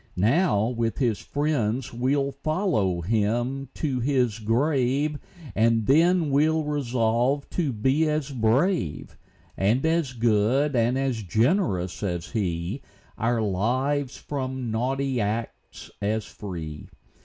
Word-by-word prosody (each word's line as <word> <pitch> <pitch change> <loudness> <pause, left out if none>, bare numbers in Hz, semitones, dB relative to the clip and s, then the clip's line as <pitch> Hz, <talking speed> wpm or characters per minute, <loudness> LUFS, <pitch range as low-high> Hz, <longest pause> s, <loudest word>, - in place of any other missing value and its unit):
Now, 110 - +2
with 115 -2 -2
his 120 -6 +1
friends, 130 -4 -1
we'll 135 +3 0
follow 140 - 0
him 120 +7 -1
to 135 -5 -1
his 125 -4 +1
grave, 135 +5 +1 0.3
And 115 +1 +2
then 165 - +4
we'll 155 +3 +3
resolve 130 -1 0
to 160 -6 0
be 135 +8 +1
as 150 -2 -1
brave, 125 - 0 0.4
And 110 +9 +1
as 160 -5 +1
good, 120 +5 +2
and 120 +2 +2
as 135 -4 -1
generous 105 - 0
as 90 -4 -3
he, 95 +2 -2 0.4
Our 115 0 +1
lives 130 +8 0
from 130 -4 -4
naughty 130 +2 -1
acts 110 +3 -5
as 105 +1 -1
free. 80 -7 -7
125 Hz, 115 wpm, -25 LUFS, 110-140 Hz, 0.4 s, then